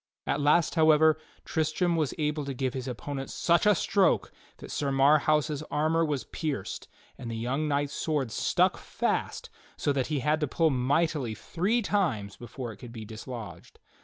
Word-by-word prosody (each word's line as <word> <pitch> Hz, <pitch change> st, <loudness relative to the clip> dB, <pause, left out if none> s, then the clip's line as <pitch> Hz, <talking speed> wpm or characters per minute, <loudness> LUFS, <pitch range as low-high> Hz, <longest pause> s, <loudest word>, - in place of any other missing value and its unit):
At -, -, 0 dB
last, 150 Hz, +3 st, +3 dB
however, 155 Hz, -1 st, +5 dB, 0.3 s
Tristram 160 Hz, +3 st, 0 dB
was 155 Hz, -4 st, 0 dB
able 150 Hz, -1 st, -1 dB
to 140 Hz, -1 st, -4 dB
give 130 Hz, -1 st, -1 dB
his 130 Hz, -1 st, -5 dB
opponent 135 Hz, +2 st, -5 dB
such 170 Hz, +4 st, +2 dB
a 210 Hz, -, +6 dB
stroke 195 Hz, +2 st, +2 dB, 0.3 s
that -, -, -10 dB
Sir 140 Hz, -1 st, -1 dB
Marhaus' 150 Hz, +2 st, +3 dB
armor 160 Hz, +2 st, +1 dB
was 145 Hz, -4 st, -1 dB
pierced, 145 Hz, -, -4 dB, 0.3 s
and 120 Hz, -, -6 dB
the 115 Hz, -, -4 dB
young 130 Hz, +7 st, -1 dB
knight's 145 Hz, -1 st, 0 dB
sword 145 Hz, -7 st, -1 dB
stuck -, -, +2 dB
fast, -, -, -2 dB, 0.3 s
so 145 Hz, -, +1 dB
that 135 Hz, -2 st, 0 dB
he 150 Hz, -3 st, -1 dB
had 150 Hz, +4 st, +1 dB
to 150 Hz, -, 0 dB
pull 160 Hz, +3 st, +2 dB
mightily 135 Hz, -1 st, 0 dB
three 205 Hz, -, -1 dB
times 135 Hz, -, 0 dB
before 120 Hz, +2 st, -7 dB
it 105 Hz, -, -12 dB
could 120 Hz, +2 st, -10 dB
be 110 Hz, -2 st, -8 dB
dislodged. 110 Hz, +1 st, -9 dB
145 Hz, 170 wpm, -28 LUFS, 130-160 Hz, 0.3 s, a